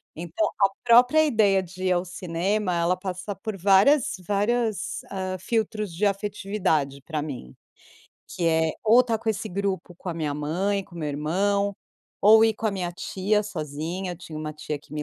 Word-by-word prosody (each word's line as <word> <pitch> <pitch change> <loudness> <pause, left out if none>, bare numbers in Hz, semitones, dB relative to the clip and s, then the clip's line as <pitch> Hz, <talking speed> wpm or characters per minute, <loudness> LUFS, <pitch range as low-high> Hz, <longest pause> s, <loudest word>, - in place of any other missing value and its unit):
Então 175 +6 -1
a 195 - +6 0.2
própria 250 +6 +6
ideia 210 -8 +3
de 185 +1 -7
ir 185 - +2
ao 175 +1 0
cinema, 180 +3 -1
ela 170 +2 +2
passa 185 +1 -5
por 215 -3 -6
várias 205 - +4
várias, 210 +1 0
ah, 185 -1 -3
filtros 215 -4 -2
de 205 +5 0
afetividade 195 -8 -1
pra 150 +1 -4
mim, 130 - -7 0.7
que 170 - -3
é 160 -1 +2
ou 235 +4 +7
tá 230 -2 -1
com 225 +1 -5
esse 215 +1 -4
grupo 190 -2 -3
com 180 - -9
a - - -5
minha 150 -3 -2
mãe, 185 +7 -1
com 175 - -18
o - - -7
meu 150 -2 -2
irmão 200 +7 0 0.5
ou 220 +2 +8
ir 225 - +3
com 220 - -3
a - - +2
minha 180 -3 -3
tia 200 +4 0
sozinha. 170 0 -4
Eu - - -9
tinha 160 -3 -9
uma 155 0 -4
tia 150 0 -5
que 145 - -19
me 150 -1 -3
190 Hz, 190 wpm, -25 LUFS, 165-210 Hz, 0.7 s, ou